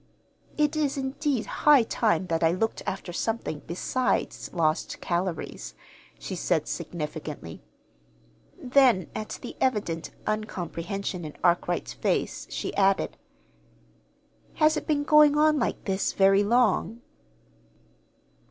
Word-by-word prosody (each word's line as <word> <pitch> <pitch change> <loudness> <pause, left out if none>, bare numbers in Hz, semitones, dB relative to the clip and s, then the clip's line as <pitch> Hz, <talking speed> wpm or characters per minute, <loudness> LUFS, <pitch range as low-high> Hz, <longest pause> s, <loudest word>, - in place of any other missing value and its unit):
"It 300 0 +2
is, 290 -2 0
indeed, 265 -2 -1
high 295 -5 +4
time 210 -6 +1
that 165 -2 -1
I 165 - +4
looked 225 +5 -1
after 190 -2 -4
something 220 -7 -2
besides 250 +9 -1
lost 160 -2 0
calories," 175 0 -3 0.4
she 190 - -6
said 165 -3 0
significantly. 150 - -6 1.0
Then, 250 - +3
at 215 - -5
the - - -7
evident 205 -10 0 0.2
uncomprehension 195 -3 -3
in 150 -1 -7
Arkwright's 175 0 +1
face, - - -1
she - - -4
added: 195 -1 +2 1.4
"Has 310 -1 +4
it - - -4
been 290 -2 +1
going 300 0 +6
on 305 0 +4
like - - -2
this 195 -1 0
very 195 +1 +4
long?" 235 +1 +2
200 Hz, 115 wpm, -26 LUFS, 175-265 Hz, 1.4 s, going